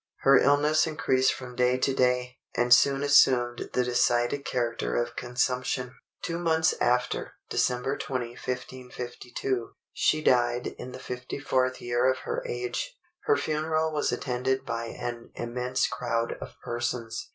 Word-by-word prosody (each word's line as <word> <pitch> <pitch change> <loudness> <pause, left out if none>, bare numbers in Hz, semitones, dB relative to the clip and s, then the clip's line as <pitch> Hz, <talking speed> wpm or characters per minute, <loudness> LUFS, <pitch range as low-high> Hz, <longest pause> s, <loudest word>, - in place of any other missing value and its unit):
Her 135 -1 +6
illness 150 +3 +3
increased 130 -4 +2
from 125 -3 -7
day 125 +1 +3
to 135 +1 +1
day, 125 0 +1 0.2
and 120 0 +5
soon 140 +2 +4
assumed 125 -4 +4
the 125 - +2
decided 120 +2 +1
character 120 -2 -1
of 120 0 -1
consumption. 125 +1 -1 0.3
Two 170 0 -2
months 160 -2 +2
after, 125 +1 +1 0.2
December 125 +3 0
20, 125 -3 -3
1552, 125 0 -5 0.2
she 155 0 +2
died 120 -2 +3
in 125 - -7
the 130 - -8
54th 130 +1 -2
year 120 +1 +2
of 130 - +1
her - - -2
age. 125 - -3 0.3
Her 440 -1 +4
funeral 155 +1 0
was 150 - 0
attended 130 +1 -1
by 115 0 -3
an 120 0 -6
immense 125 +2 -1
crowd 115 -2 -1
of - - -8
persons. 120 -1 -3
125 Hz, 140 wpm, -27 LUFS, 120-135 Hz, 0.3 s, Her